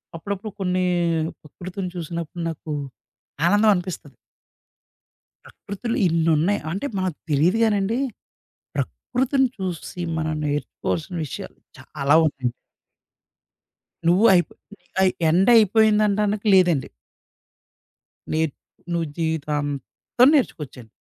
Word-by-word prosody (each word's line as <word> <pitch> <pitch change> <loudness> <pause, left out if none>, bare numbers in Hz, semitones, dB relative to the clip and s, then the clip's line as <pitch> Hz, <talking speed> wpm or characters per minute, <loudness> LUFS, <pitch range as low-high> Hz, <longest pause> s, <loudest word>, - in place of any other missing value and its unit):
అప్పుడప్పుడు 200 +5 -5
కొన్ని 185 -1 0 0.6
ప్రకృతిని 180 +4 -7
చూసినప్పుడు 170 0 -5
నాకు 160 -1 -7 0.8
ఆనందం 205 +4 +4
అనిపిస్తది. 175 -6 -6 1.3
ప్రకృతులు 230 +4 -5
ఇన్నున్నాయి. 165 +3 +2
అంటే 195 - -3
మనకు 185 -4 -2
తెలీదు 160 +9 +3
గానండి, 210 +1 +1 0.8
ప్రకృతిని 265 +1 0
చూసి 180 -2 -5 0.2
మనం 155 0 -1
నేర్చుకోవాల్సిన 150 +3 -3
విషయాలు 140 - -8 0.2
చాలా 140 +2 0
ఉన్నాయి. 135 -5 -1 1.6
నువ్వు 185 +6 +4
అయిపో 175 -1 +2 0.3
ని 175 - -36 0.2
అయి 190 -1 +4 0.2
ఎండ్ 180 +6 +3
అయిపోయింది 215 0 +5
అనడానికి 210 +1 0
లేదండి. 175 -7 +3 1.4
నే 155 - +1 0.5
నువ్వు 170 -1 0
జీవితాంతం 150 - 0
నేర్చుకోవచ్చండి. 130 - -3
180 Hz, 90 wpm, -23 LUFS, 155-205 Hz, 1.6 s, అయిపోయింది